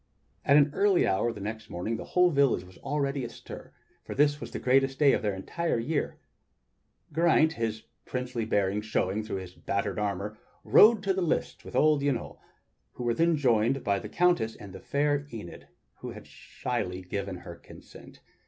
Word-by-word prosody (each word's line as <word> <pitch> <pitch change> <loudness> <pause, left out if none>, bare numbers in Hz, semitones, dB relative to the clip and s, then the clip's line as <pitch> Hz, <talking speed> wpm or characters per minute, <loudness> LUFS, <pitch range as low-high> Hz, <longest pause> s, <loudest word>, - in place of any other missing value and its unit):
At 140 - +5
an 145 0 +5
early 200 0 +3
hour 105 +5 +1
the 105 - -9
next 110 +1 -6
morning 90 +7 -3
the - - -6
whole 180 -1 +3
village 140 - +2
was 90 0 -16
already 140 -1 -1
astir, 120 - -9 0.3
for - - -7
this 145 +1 +2
was - - -6
the - - -5
greatest 135 +1 +2
day 145 -3 +5
of - - +1
their 105 -3 -1
entire 165 - -2
year. 145 +7 -2 1.0
Geraint, 160 0 +4
his 110 -3 -3 0.2
princely 125 -2 -3
bearing 100 -1 0
showing 105 -1 -1
through 110 - -5
his 95 -1 -8
battered 100 +3 -2
armor, 105 +1 -3 0.2
rode 215 -2 +6
to 195 -1 +1
the 190 - -1
lists 165 -2 -1
with - - -10
old 155 -2 +4
Yniol, 140 -4 -2 0.6
where 120 -1 -1
they 165 +7 +2
were 170 - +3
joined 125 -2 +2
by 100 -1 +1
the - - -8
Countess 175 -11 +2
and 100 -3 -11
the 95 - -8
fair 145 +3 0
Enid, 105 -10 -9 0.3
who - - -7
had - - -11
shyly 90 +1 -5
given 100 +1 -4
her 85 -1 -10
consent. - - -15
120 Hz, 180 wpm, -28 LUFS, 105-145 Hz, 1.0 s, rode